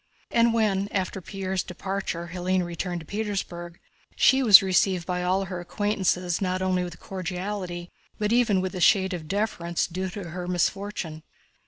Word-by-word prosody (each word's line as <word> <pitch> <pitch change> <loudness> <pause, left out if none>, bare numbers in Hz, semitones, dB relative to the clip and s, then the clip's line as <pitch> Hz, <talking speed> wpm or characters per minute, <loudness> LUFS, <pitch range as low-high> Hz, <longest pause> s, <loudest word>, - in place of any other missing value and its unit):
And 235 0 +4
when 205 -4 +1
after 190 -1 -2
Pierre's 190 0 -3
departure 180 -2 -4
Hélène 185 0 0
returned 175 0 -4
to - - -12
Petersburg, 185 -4 -4 0.4
she 265 0 +5
was 210 -6 +9
received 185 -1 +2
by 180 +1 -2
all 185 +2 +1
her 185 -2 -5
acquaintances 180 -2 0
not 185 -1 0
only 185 -1 0
cordially, 180 -1 -5 0.3
but 210 +1 0
even 230 -6 +3
with 185 +1 -3
a 185 - -4
shade 190 0 +4
of 165 -3 -5
deference 180 -3 -1
due 185 +2 -3
to 180 -3 -7
her 180 +1 -5
misfortune. 180 -2 -2
185 Hz, 155 wpm, -26 LUFS, 175-200 Hz, 0.4 s, was